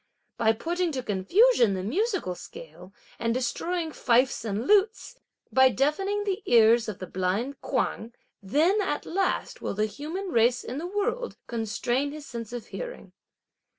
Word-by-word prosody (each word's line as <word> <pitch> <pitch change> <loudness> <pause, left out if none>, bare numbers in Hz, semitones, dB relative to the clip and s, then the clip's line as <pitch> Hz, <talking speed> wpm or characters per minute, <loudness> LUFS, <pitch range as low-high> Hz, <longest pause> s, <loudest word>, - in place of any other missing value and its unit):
By 225 -1 +4
putting 345 +8 -1
to 260 -2 -3
confusion 225 - +3
the 185 - -3
musical 370 - -1
scale, 175 +1 -12 0.3
and 230 0 0
destroying 325 +6 -2
fifes 250 -3 +2
and 220 +1 -2
lutes, 420 - +2 0.3
by 260 0 +6
deafening 385 +11 0
the 400 0 -2
ears 230 0 +5
of 205 - -5
the 185 - -6
blind 190 +10 -2
Kuang, 235 -3 -2 0.3
then, 315 - +2
at 370 -7 -2
last, 380 +1 -1
will - - -3
the 215 +1 +1
human 310 - -5
race 240 -3 +3
in 255 +4 -5
the 340 - -4
world 455 +6 -2
constrain 240 +5 -1
his 300 -1 -8
sense 235 -4 -7
of 245 -2 -6
hearing. - - -8
260 Hz, 150 wpm, -27 LUFS, 225-370 Hz, 0.3 s, by